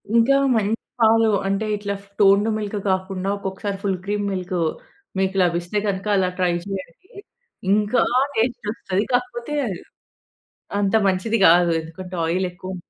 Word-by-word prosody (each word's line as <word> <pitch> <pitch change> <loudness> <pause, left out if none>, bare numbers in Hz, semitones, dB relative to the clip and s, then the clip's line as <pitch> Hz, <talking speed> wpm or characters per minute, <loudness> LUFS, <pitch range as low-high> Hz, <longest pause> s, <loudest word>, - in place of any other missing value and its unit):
ఇంకా 235 +4 +5 0.2
మంచి 215 0 +1 0.3
పాలు 225 0 +5 0.2
అంటే, 195 +2 0
ఇట్ల 205 0 -4
ఫ్ - - -22
టోన్‌డ్ 200 +1 +5
మిల్క్ 210 -1 -3
కాకుండా, 190 0 -2
ఒకొక్కసారి 195 0 -4
ఫుల్ 195 -2 0
క్రీమ్ 205 0 -1
మిల్కు 180 -1 -2 0.6
మీకు 190 0 0
లభిస్తే 175 +3 -1
కనక, 195 0 -2
అలా 185 -1 +2
ట్రై 180 -1 +2
చేయండి. 195 - -7 0.6
ఇంకా 210 +3 +2 0.3
టేస్టొస్తది. 220 -4 -1
కాకపోతే, 245 +2 -1 1.2
అంత 200 +1 +1
మంచిది 195 +4 +1
కాదు. 175 +1 +5
ఎందుకంటే, 180 +3 -9
ఆయిల్ 180 +3 0
ఎక్కుం 185 +1 -7
195 Hz, 130 wpm, -22 LUFS, 185-215 Hz, 1.2 s, ఇంకా